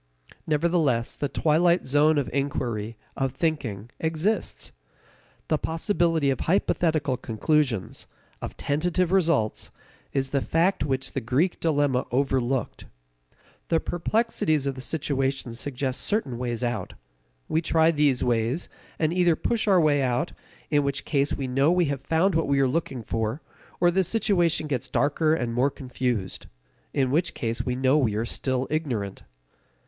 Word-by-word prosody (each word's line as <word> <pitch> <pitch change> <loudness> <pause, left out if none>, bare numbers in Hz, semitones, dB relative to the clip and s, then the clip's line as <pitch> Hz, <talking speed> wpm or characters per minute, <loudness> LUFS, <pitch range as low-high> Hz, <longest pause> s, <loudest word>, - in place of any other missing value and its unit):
Nevertheless 150 -6 +1
the 145 - -2
twilight 170 +5 +2
zone 145 +3 +3
of 140 -4 0
inquiry, 120 -6 -2 0.2
of 135 -2 -1
thinking, 125 - -2
exists. 165 +7 -1 0.8
The 155 - +1
possibility 165 -3 +1
of 130 - -2
hypothetical 160 -6 +1
conclusions, 115 -1 -1 0.3
of - - -6
tentative 175 +4 0
results, 165 - +1 0.4
is 135 -1 -1
the 140 - +1
fact 170 +7 +1
which 135 -2 -1
the - - -2
Greek 135 +10 0
dilemma 145 -5 +1
overlooked. 130 -1 -1 0.8
The 165 - +2
perplexities 175 - 0
of 140 - 0
the 130 - -8
situation 135 -2 -2
suggest 130 +2 -3
certain 140 - -1
ways 120 -1 -2
out. 120 -1 -3 0.5
We 160 - +1
try 160 0 +3
these 145 -5 +2
ways, 120 +6 0 0.3
and 155 0 +1
either 175 -2 +3
push 230 +4 -1
our 190 -3 +5
way 150 -3 +3
out, 130 +5 0 0.4
in 145 -1 +4
which 140 -1 -2
case 140 -1 +1
we 135 - -3
know 135 +5 +2
we 180 -1 +3
have 135 - -6
found 165 +7 +2
what 165 0 +1
we 140 0 +2
were 135 - +4
looking 130 -3 -2
for, 115 +6 -2 0.4
or 175 0 +4
the 190 +2 +2
situation 175 -6 +1
gets 135 -3 -3
darker 155 +4 +2
and 120 -6 -2
more 125 +4 +2
confused 125 -7 -3 0.4
in 130 -2 +1
which 165 +6 +1
case, 115 -1 -2
we 125 -1 -2
know 130 +3 +3
we 115 -7 +1
are 110 +2 -1
still 130 +2 -1
ignorant. 120 -11 -2
140 Hz, 150 wpm, -25 LUFS, 125-165 Hz, 0.8 s, our